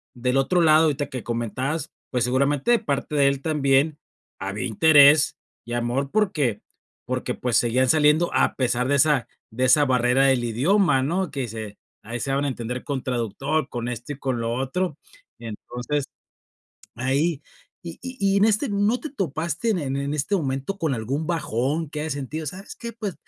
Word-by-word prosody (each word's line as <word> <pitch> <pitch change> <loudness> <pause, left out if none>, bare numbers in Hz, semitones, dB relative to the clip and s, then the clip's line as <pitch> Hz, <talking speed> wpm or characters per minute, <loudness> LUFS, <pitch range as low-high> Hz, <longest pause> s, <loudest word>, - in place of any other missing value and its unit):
del 125 +2 0
otro 175 +6 +2
lado, 155 0 +6
ahorita 145 -1 0
que 130 -4 -6
comentabas, 130 +7 -3 0.2
pues, 125 -2 +1
seguramente, 140 - +1
de 235 - +5
parte 140 0 -3
de 140 -1 +4
él, 140 -1 -2
también, 145 0 +2 0.4
había 100 +2 -4
interés 145 +4 +6 0.3
y 120 - -6
amor, 120 +4 -1
porque 150 - 0 0.4
porque, - - -3
pues, 125 -2 -1
seguían 125 +2 +2
saliendo, 155 +3 +4
a - - +2
pesar 125 -1 0
de 140 - +3
esa 145 -3 +3 0.2
de 125 +4 -2
esa 145 +3 +5
barrera 125 +1 +3
del 130 -3 +2
idioma, 135 - +2
¿no? 175 +5 -1
Que 135 -4 -3
se 110 -2 -7 0.3
ahí 115 +2 -5
se 135 - -2
daban 140 +1 +1
a - - 0
entender 125 0 -5
con 140 -3 -3
traductor, 130 +5 -2
con 120 -1 -4
esto 120 +3 -6
y 140 - -12
con 130 -3 -2
lo 115 0 -1
otro. 140 +6 -2 0.4
Entonces, 120 +5 -4 0.9
ahí 140 +5 0 0.4
y 170 -1 -8
y 260 0 -7
y 195 0 +2
en 200 - +4
este, 220 +5 +1
¿no 205 +4 +1
te 310 - -6
topaste 170 - -2
en 200 - +1 0.2
en 140 +1 -2
este 150 +7 -1
momento, 135 +4 -3
con 155 -7 0
algún 135 +8 -3
bajón, 150 -1 -1
que 150 - -4
hayas 155 -2 -2
sentido? 145 +3 -5
"¿Sabes 190 +7 -7
qué?, 235 -1 -7
pues". 210 -5 -5
140 Hz, 180 wpm, -24 LUFS, 125-160 Hz, 0.9 s, lado